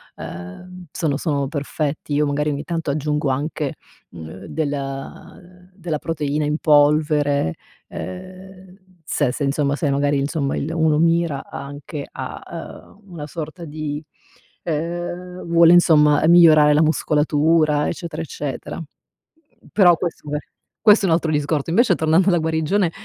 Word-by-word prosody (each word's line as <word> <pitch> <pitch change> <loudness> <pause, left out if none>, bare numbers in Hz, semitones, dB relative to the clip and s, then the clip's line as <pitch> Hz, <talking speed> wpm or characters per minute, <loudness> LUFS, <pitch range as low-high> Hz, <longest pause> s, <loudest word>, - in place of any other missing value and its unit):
ehm, 175 - -9
sono 150 -4 -1
sono 140 -3 -1
perfetti. 145 +1 -3
Io 150 +1 +2
magari 145 +1 0
ogni 145 0 -3
tanto 165 -2 -3
aggiungo 150 0 -1
anche, 145 +1 -2 0.3
uhm, 85 +3 -10
del 145 +5 -6
della 170 -5 -4
proteina 150 -2 -2
in 150 +1 0
polvere, 145 - +3 0.4
ehm, 90 - -6 0.9
se 145 -4 0
se 145 - -3
insomma, 140 0 0
se 150 0 -1
magari, 145 +1 +1
insomma, 140 0 -1
il 155 - -3
uno 160 -2 +2
mira 165 -3 +1
anche 145 +1 -7
a, - - -7 0.5
ehm, 205 - -21
una 150 -4 -7
sorta 160 +2 -7
di, 150 -1 -5 0.6
ehm, 175 +3 -4
vuole 170 0 +5
insomma 150 -4 +5
migliorare 160 -3 +7
la 150 - +4
muscolatura, 155 0 +2
eccetera 165 -2 -5
eccetera. 145 -1 -6 0.9
Però 180 -4 +5
questo 170 -4 -5
è, - - +1 0.4
questo 210 -2 +5
è - - +2
un 165 - +5
altro 165 -1 -1
discorso. 150 0 -1
Invece 205 0 +4
tornando 160 +4 +2
alla 175 - +3
guarigione 160 +3 0
155 Hz, 135 wpm, -21 LUFS, 145-165 Hz, 0.9 s, migliorare